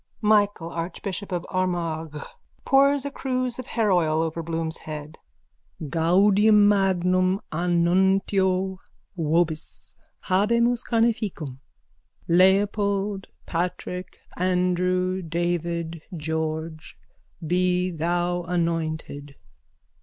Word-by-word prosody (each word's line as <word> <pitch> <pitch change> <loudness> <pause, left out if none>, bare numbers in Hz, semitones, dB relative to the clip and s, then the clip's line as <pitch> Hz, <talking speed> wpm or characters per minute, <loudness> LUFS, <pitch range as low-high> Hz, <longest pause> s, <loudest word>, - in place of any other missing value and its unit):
MICHAEL, 205 -5 +2
ARCHBISHOP 185 +3 -5
OF 175 -1 -2
ARMAGH: 165 -5 -2 0.4
(Pours 275 0 +4
a 280 - -3
cruse 255 -2 -2
of 255 - -6
hairoil 175 -8 +2
over 165 +1 -3
Bloom's 165 0 -3
head.) 150 0 -8 0.7
Gaudium 200 +6 +4
magnum 185 -1 +2
annuntio 185 +2 +1 0.4
vobis. 160 -1 -1 0.3
Habemus 235 +5 +2
carneficem. 215 - 0 0.7
Leopold, 195 +2 +2 0.2
Patrick, 180 +1 -4 0.2
Andrew, 180 +1 +1
David, 170 -1 -2 0.2
George, 160 0 -4 0.5
be 180 +2 +1
thou 175 +2 -1
anointed! 160 -4 -2
180 Hz, 80 wpm, -24 LUFS, 165-195 Hz, 0.7 s, Pours